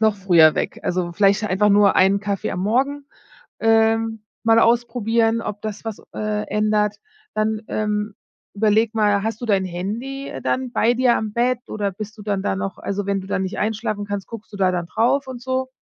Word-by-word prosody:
noch 220 -2 +3
früher 170 -5 +5
weg. - - -3
Also, 175 -1 -1
vielleicht 200 +3 +3
einfach 210 +1 +2
nur 200 -1 +5
einen 195 +2 +4
Kaffee 200 -2 -2
am 180 - -3
Morgen, 275 +7 0 0.5
ähm, 225 0 +2 0.2
mal 225 0 +5
ausprobieren, 230 -1 +2
ob 210 -2 -5
das 215 0 -6
was, 220 -2 -5
äh, 210 0 -2
ändert. 210 0 +1 0.4
Dann, 215 0 0
ähm, 210 -1 -2 0.4
überlege 215 +1 +2
mal, 205 -2 +2
hast 225 +1 -3
du 240 - -4
dein 195 -3 +2
Handy 230 +10 -5
dann 255 -1 -1
bei 230 +1 +2
dir 250 -1 +3
am 215 -1 -3
Bett 245 +2 +1
oder 205 -2 -2
bist 215 +3 -8
du - - -9
dann 200 -2 -2
da 95 - -1
noch 100 0 -4
also, 200 0 -3
wenn 200 -1 0
du 190 - -10
dann 190 0 -1
nicht 190 - -4
einschlafen 215 -1 -2
kannst, 205 -1 -4
guckst 225 -2 -10
du - - -7
da 190 -1 +2
dann 175 -1 -2
drauf 265 +8 +1
und 250 -2 -8
so. 260 0 -1
215 Hz, 195 wpm, -21 LUFS, 200-225 Hz, 0.5 s, früher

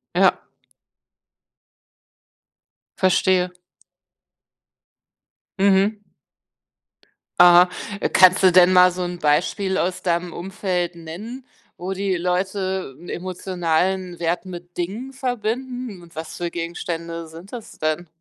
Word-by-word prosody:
Ja. - - +4 2.6
Verstehe. 185 -1 +2 2.1
Mhm. 200 +2 +3 1.4
Aha. 175 0 +8 0.4
Kannst 185 -1 +6
du 185 - +7
denn 180 +1 +6
mal 180 0 +7
so 180 +1 -4
'n 175 0 -5
Beispiel 180 +6 +1
aus 180 0 -1
deinem 170 -1 -1
Umfeld 180 -2 -3
nennen, 205 +11 -8 0.3
wo 185 +2 -4
die 195 0 -1
Leute 185 -2 -2
'n 175 - -11
emotionalen 180 0 -2
Wert 170 +2 -1
mit 175 -1 -9
Dingen 215 +10 -4
verbinden? 245 -3 -3
Und 170 -1 -17
was 160 0 -6
für 175 -1 -2
Gegenstände 170 0 -5
sind 165 +6 -13
das 235 -3 -9
denn? 155 +3 -1
180 Hz, 100 wpm, -22 LUFS, 175-195 Hz, 2.6 s, Aha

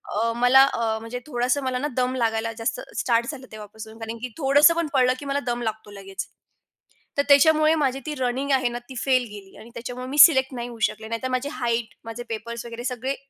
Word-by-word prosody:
अ, 230 +2 +1
मला 245 +3 +6
अ, 225 -1 -1
म्हणजे 230 +2 -6
थोडसं 255 +1 0
मला 260 -1 -1
ना 285 +4 -2
दम 255 0 +1
लागायला 225 -2 -1
जास्त 225 0 -2 0.2
स्टार्ट 235 -1 +1
झालं 270 -3 -10
तेव्हापासून 220 +1 -10
कारण 225 +1 -6
की 255 - -3
थोडसं 290 +2 +5
पण 335 -1 -1
पळालं 255 -2 +4
की 285 - -9
मला 280 0 -1
दम 240 0 -3
लागतो 220 -2 -5
लगेच, 195 -1 -7 0.9
तर 285 - +3
त्याच्यामुळे 310 +2 +5
माझी 270 -4 0
ती 305 - -3
रनिंग 260 +1 -2
आहे 260 -2 +2
ना 240 0 -5
ती 260 - -9
फेल 255 +1 +2
गेली 200 -2 -12
आणि 230 - -13
त्याच्यामुळे 250 +2 -6
मी 275 +3 -5
सिलेक्ट 265 -4 +7
नाही 240 -1 -5
होऊ 235 -1 -11
शकले, 220 - -10
नाहीतर 230 +3 -3
माझी 255 +3 -1
हाईट, 235 -5 -2
माझे 230 +1 -6
पेपर्स 235 +1 -5
वगैरे 235 0 -7
सगळे 255 +2 -2
245 Hz, 210 wpm, -24 LUFS, 230-265 Hz, 0.9 s, सिलेक्ट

